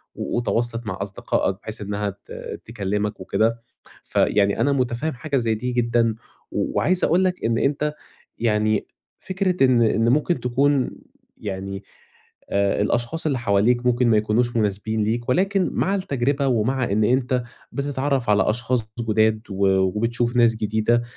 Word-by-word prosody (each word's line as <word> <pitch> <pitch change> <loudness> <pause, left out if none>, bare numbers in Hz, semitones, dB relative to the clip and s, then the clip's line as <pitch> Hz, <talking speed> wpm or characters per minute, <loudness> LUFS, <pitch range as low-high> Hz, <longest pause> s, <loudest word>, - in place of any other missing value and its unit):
وتواصلت 120 -1 -2
مع 95 - -3
أصدقائك 95 -1 -1
بحيث 110 0 -7
إنّها 105 0 -2 0.2
ت - - -7
تكلمك 105 -1 -2
وكده. 115 +5 0 0.4
فيعني 100 -1 +2
أنا 145 - +3
مُتفهم 130 +3 -1
حاجة 135 +3 -2
زي 115 -2 +1
دي 125 +3 -3
جدًا، 115 -2 +1 0.4
وعايز 185 0 0
أقول 180 +3 +3
لك، 180 -7 -1
إن 115 0 +1
أنت 150 +3 0 0.4
يعني 110 -2 +1 0.3
فكرة 185 -5 +1
إن 125 -2 +4
إن 115 +1 +3
مُمكن 150 +3 +2
تكون 130 +2 +1 0.5
يعني 95 0 -5 0.7
آآ 100 0 +1
الأشخاص 120 +10 -1
اللي 140 -4 +1
حواليك 120 +3 +2
مُمكن 125 0 +3
ما 110 - +4
يكونوش 110 +3 +1
مُناسبين 105 +1 0
ليك، 120 +3 -1
ولكن 195 +6 +2
مع 195 +2 +1
التجربة، 140 -5 0
ومع 125 +2 +1
إن 105 +2 +2
أنت 125 +2 +1 0.3
بتتعرّف 140 -3 -1
على 105 -1 +3
أشخاص 120 +2 0 0.2
ض 115 -2 -1
جداد، 110 0 +3
و 100 0 +1
وبتشوف 115 +6 +1
ناس 115 -2 +4
جديدة، 110 +2 +1
120 Hz, 145 wpm, -23 LUFS, 105-130 Hz, 0.7 s, إن